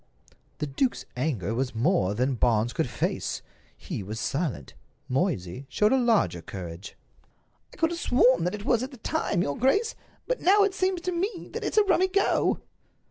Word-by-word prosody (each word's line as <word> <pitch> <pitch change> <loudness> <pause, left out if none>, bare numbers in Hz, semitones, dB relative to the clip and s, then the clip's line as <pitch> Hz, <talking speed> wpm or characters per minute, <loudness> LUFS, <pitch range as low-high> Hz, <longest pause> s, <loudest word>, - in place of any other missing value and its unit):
The - - -2
duke's 190 - -1
anger 125 - -1
was 125 0 -2
more 115 - +2
than 130 +4 +1
Barnes 120 -1 +2
could 160 -6 -1
face. - - -2 0.3
He - - -5
was 105 +3 -6
silent. 135 - -2 0.3
Moysey 130 - -1
showed 210 +4 +3
a 265 - +4
larger 225 - +2
courage. 85 0 -8 0.7
"I - - -16
could 325 0 +2
have 340 - -3
sworn 250 - +4
that 180 - -1
it 205 0 -8
was 240 -2 +3
at 255 - -3
the 265 - -12
time, 230 - 0
your 140 - -2
grace. 405 - +2 0.3
But - - -2
now 405 +3 +5
it 400 -1 +1
seems 370 -1 0
to 365 - -2
me 365 +2 -3
that - - -4
it's - - -2
a 425 - +7
rummy 375 -1 +3
go." 395 +1 +1
180 Hz, 185 wpm, -27 LUFS, -, 0.7 s, a